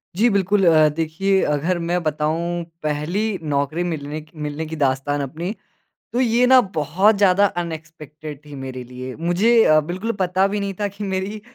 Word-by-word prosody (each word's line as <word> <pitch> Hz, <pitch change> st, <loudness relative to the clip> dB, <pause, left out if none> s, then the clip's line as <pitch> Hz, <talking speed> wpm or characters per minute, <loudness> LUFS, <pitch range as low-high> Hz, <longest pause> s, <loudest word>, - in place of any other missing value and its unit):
जी 225 Hz, +6 st, +4 dB
बिल्कुल। 200 Hz, -1 st, +2 dB
अ, 155 Hz, -2 st, +6 dB
देखिए 170 Hz, +5 st, +1 dB
अगर 160 Hz, +5 st, 0 dB
मैं 175 Hz, +1 st, +1 dB
बताऊँ 160 Hz, +3 st, -1 dB, 0.2 s
पहली 155 Hz, +6 st, -1 dB, 0.2 s
नौकरी 150 Hz, +2 st, -1 dB
मिलने 155 Hz, -3 st, -4 dB
क 155 Hz, +1 st, -20 dB
मिलने 150 Hz, +2 st, -4 dB
की 160 Hz, +1 st, -6 dB
दास्तान 140 Hz, 0 st, 0 dB
अपनी, 160 Hz, +7 st, -4 dB, 0.6 s
तो 245 Hz, -, 0 dB
ये 245 Hz, 0 st, +3 dB
ना 260 Hz, 0 st, +7 dB, 0.2 s
बहुत 180 Hz, +9 st, +3 dB
ज़्यादा 200 Hz, 0 st, +4 dB, 0.2 s
अनएक्सपेक्टेड 155 Hz, -2 st, -9 dB
थी 145 Hz, -, -10 dB
मेरे 130 Hz, -1 st, -6 dB
लिए। 125 Hz, +1 st, -8 dB
मुझे 175 Hz, +8 st, +2 dB
अ, 155 Hz, -, +5 dB
बिल्कुल 185 Hz, +9 st, -3 dB
पता 185 Hz, +1 st, +2 dB
भी 205 Hz, +1 st, -2 dB
नहीं 200 Hz, -1 st, -3 dB
था 205 Hz, -, +1 dB
कि 200 Hz, +1 st, -7 dB
मेरी 195 Hz, +2 st, -3 dB
165 Hz, 170 wpm, -21 LUFS, 150-195 Hz, 0.6 s, ना